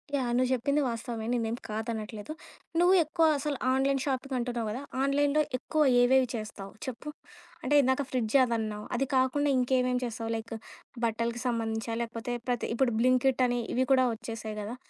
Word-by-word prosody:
Yeah! 255 -3 0
నువ్వు 255 0 +2
చెప్పింది 280 +4 +1
వాస్తవమే. 230 -1 -4
నేనేం 230 -1 0
కాదనట్లేదు. 220 +3 -4 0.5
నువ్వు 355 +2 +5
ఎక్కువ 320 +2 +1
అసలు 285 -1 -2
ఆన్‌లైన్ 270 +1 +2
షాపింగ్ 265 0 -2
అంటున్నావు 240 -2 -2
కదా! 250 +5 -4 0.2
ఆన్‌లైన్‌లో 285 +2 +2 0.2
ఎక్కువ 310 +4 -1 0.2
ఏవేవి 255 +1 +4
చేస్తావు 210 -3 -7
చెప్పు? 260 +3 -6 0.5
అంటే, 290 - +2
ఇందాక 260 +1 +2
ఫ్రిడ్జ్ 245 -1 -1
అవన్నావు, 220 -3 -2
అది 270 - +1
కాకుండా 270 +3 +2
ఇంకేమేమి 250 0 +1
చేస్తావు 230 -1 -4
లైక్ 225 0 -6 0.5
బట్టలకి 230 +1 -1
సంబంధించా? 225 -1 -2
లేకపోతే 235 +1 -4 0.2
ప్రతి 245 -1 -1
ఇప్పుడు 245 -2 +2
'బ్లింకిట్' 255 +1 +3
అని 245 0 0
ఇవి 260 +1 +2
కూడా 260 -1 +5
వచ్చేసాయి 225 -2 -6
గదా! 220 +4 -5
245 Hz, 155 wpm, -29 LUFS, 225-265 Hz, 0.5 s, నువ్వు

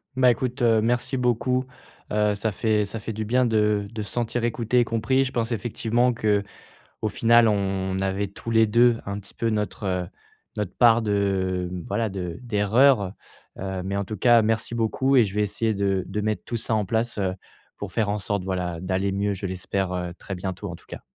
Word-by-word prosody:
Bah, 130 -1 +5
écoute, 125 +1 -3
heu, 115 -2 +4
merci 120 +4 0
beaucoup. 125 +1 +1 0.5
Heu, 105 -1 +2
ça 110 +2 -1
fait 105 +1 +1
ça 110 +2 -6
fait 115 - -5
du 110 +1 -4
bien 125 +4 +2
de 105 -3 +1
de 115 -2 -5
se 105 - -4
sentir 120 0 -1
écouté 120 +1 +1
et 120 - +3
compris. 115 +4 +1
Je 130 - -4
pense 115 0 -1
effectivement 120 +2 +1
qu'au 105 -3 -1 0.5
final 115 +1 +4
on 95 -2 -1
avait 95 +1 -1
tous 100 +4 -9
les 115 0 +5
2 115 +2 +4
un 100 +1 -4
petit 100 - -14
peu 115 - -1
notre, 105 -1 -2
heu, 90 -2 -1 0.5
notre 105 -3 -3
part 115 -1 +6
de, 95 -3 0
mmh, 90 0 -5
voilà 110 +3 0
de 90 -1 -5
d'erreurs. 110 -1 +3 0.5
Heu, 95 -1 -3
mais 100 +1 -2
en 100 - -1
tout 110 - -5
cas 120 +3 +5
merci 110 +2 -1
beaucoup 130 +4 +1
et 120 - +6
je 100 0 -7
vais 105 - +2
essayer 110 +2 0
de 100 -2 0
de 105 +2 -3
mettre 110 0 -1
tout 120 - -4
ça 115 0 -1
en 105 -2 0
place, 115 +3 -1
heu, 95 -2 0 0.4
pour 100 -2 -7
faire 110 0 0
en 105 - 0
sorte 100 -1 -2
voilà, 90 -3 -2
d'aller 95 +2 -1
mieux, 100 +1 0
je 100 +1 -6
l'espère, 95 +1 -2
heu, 90 -1 -3
très 95 - -6
bientôt 95 +2 -5
en - - -6
tout - - -21
cas. - - -8
105 Hz, 215 wpm, -24 LUFS, 95-115 Hz, 0.5 s, part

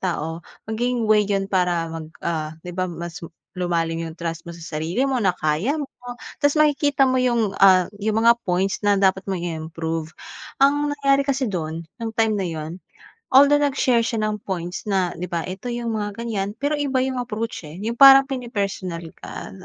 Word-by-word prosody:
tao 165 -3 -3 0.2
maging 240 +2 -1
way 215 -1 +4
'yun 195 -1 +1
para 180 -3 +1
mag, 160 -1 -6 0.2
ah, 155 -1 -2
'di 180 - -6
ba 185 +1 -2
mas 170 0 -7 0.3
lumalim 165 -2 -1
yung 160 - -10
trust 165 -1 -5
mo - - -6
sa 165 - -10
sarili 165 - -1
mo 265 -3 0
na 185 -3 +1
kaya 155 - 0
mo 295 - -2 0.6
ta's 290 +1 +2
makikita 290 -2 +3
mo 260 -1 +2
yung, 235 -5 +1
ah, 185 -2 +7 0.2
yung 220 +2 0
mga 235 0 +5
points 190 +2 0
na 205 -1 +3
dapat 190 0 +2
mong 190 -2 -1
i-improve. 160 -1 -4 0.5
Ang 290 +2 +3
nangyari 275 -1 +3
kasi 275 -1 0
do'n 165 -3 -4 0.2
nung 225 -1 -3
time 225 -1 +3
na 190 - -1
'yon, 160 +2 -6 0.5
although 285 +2 +7
nag-share 270 -4 +2
siya 225 -3 -1
ng 215 0 -1
points 180 0 -4
na 190 -3 +1
'di 180 - -3
ba, 170 -1 -1
ito 190 +5 -7
yung 235 -1 -3
mga 205 -1 -3
ganyan, 205 -3 -3
pero 285 +5 -1
iba 270 -3 +1
yung 260 -1 -2
approach, 225 -6 -4
eh, 150 - -10
yung 230 +2 -2
parang 270 0 +10
pini-personal 200 -9 -3 0.2
ka. - - -8
200 Hz, 185 wpm, -22 LUFS, 170-250 Hz, 0.6 s, parang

